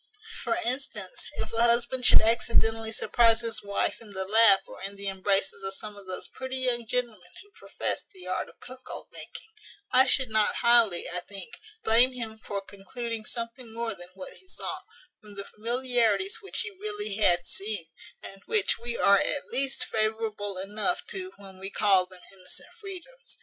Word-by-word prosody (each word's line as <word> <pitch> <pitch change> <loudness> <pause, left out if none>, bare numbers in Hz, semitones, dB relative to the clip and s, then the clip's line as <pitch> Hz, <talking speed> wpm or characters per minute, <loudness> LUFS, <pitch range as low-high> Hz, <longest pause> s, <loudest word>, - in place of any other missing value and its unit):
For - - +1
instance, 265 - -4
if - - -4
a 230 - +3
husband 235 +2 +4
should - - +8
accidentally 225 0 +3
surprize 230 +1 +4
his 230 -1 -3
wife 200 +2 -1
in 225 - -12
the 190 0 -3
lap 215 -1 +6
or - - -11
in 195 +1 -5
the 200 0 -6
embraces 195 0 0
of 195 0 -5
some 210 +1 -8
of 200 -2 -13
those 185 - -5
pretty 260 0 -6
young 245 -3 0
gentlemen 220 -7 -2
who 410 - -25
profess - - -3
the 375 -2 -13
art - - -2
of - - -20
cuckold 255 +1 -8
making, - - -11 0.4
I 260 +1 +6
should 260 -3 +2
not 215 -1 +2
highly, 230 -7 +6
I 180 - -2
think, 195 +3 -7 0.2
blame 240 +4 +6
him 225 -3 -6
for 200 -2 -4
concluding 220 +3 -6
something 235 +1 -7
more 230 0 -3
than 175 -2 -12
what 190 -1 -8
he 375 - -20
saw, - - -5 0.4
from 210 -1 -14
the 200 - -5
familiarities 230 -4 0
which 395 - -3
he 455 - -4
really 415 - -4
had 175 -5 +3
seen, 200 -4 -3 0.4
and 195 0 -10
which 435 -2 +2
we 235 0 -3
are 200 0 +5
at 285 - 0
least 270 0 +1
favourable 215 -2 -2
enough 210 - 0
to 375 -1 -5
when 195 -2 -12
we 195 +1 -5
call 195 -3 +3
them 185 -1 -14
innocent 185 -1 -6
freedoms. 425 +5 -10
225 Hz, 180 wpm, -28 LUFS, 200-250 Hz, 0.4 s, should